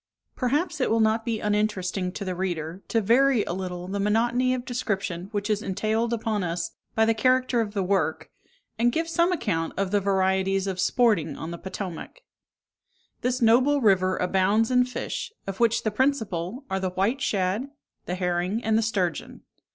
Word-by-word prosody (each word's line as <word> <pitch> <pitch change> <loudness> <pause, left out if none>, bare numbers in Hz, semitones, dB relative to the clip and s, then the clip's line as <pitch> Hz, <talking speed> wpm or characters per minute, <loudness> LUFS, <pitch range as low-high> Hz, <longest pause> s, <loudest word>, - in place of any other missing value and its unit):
Perhaps 290 +5 0
it - - +2
will 225 - +2
not 220 +1 +2
be 230 -2 -1
uninteresting 200 -3 0
to 200 - -5
the 185 - -2
reader, 175 -1 -3
to 225 - +1
vary 240 +2 +4
a - - -4
little 180 -1 -5
the 200 +2 -3
monotony 240 +5 +2
of 250 -1 -5
description 195 -7 -3
which 205 -1 -2
is 210 -1 0
entailed 215 +4 -1
upon 220 -3 -1
us 170 -1 -2 0.2
by 220 - +4
the 225 - +3
character 255 +1 +2
of 210 -1 -4
the 195 - +1
work, 180 -4 -1 0.5
and 240 +1 +3
give 325 +5 -1
some 340 +2 +2
account 180 - -1
of 195 -1 -1
the 205 - +3
varieties 190 0 +1
of 190 -2 -3
sporting 210 -3 +2
on 160 - -6
the 170 - -5
Potomac. 190 - -7 1.0
This 250 0 0
noble 255 +6 +4
river 185 -5 +3
abounds 195 +5 +2
in 250 0 +4
fish, 250 - -4
of 195 -1 -5
which 230 -1 +2
the 215 - 0
principal 225 - -1
are 190 - -1
the 190 -1 -1
white 200 +9 0
shad, 200 +2 0 0.4
the 180 - -2
herring, 180 +4 -1
and 220 0 +2
the - - +2
sturgeon. 190 -7 -2
210 Hz, 180 wpm, -25 LUFS, 185-235 Hz, 1.0 s, vary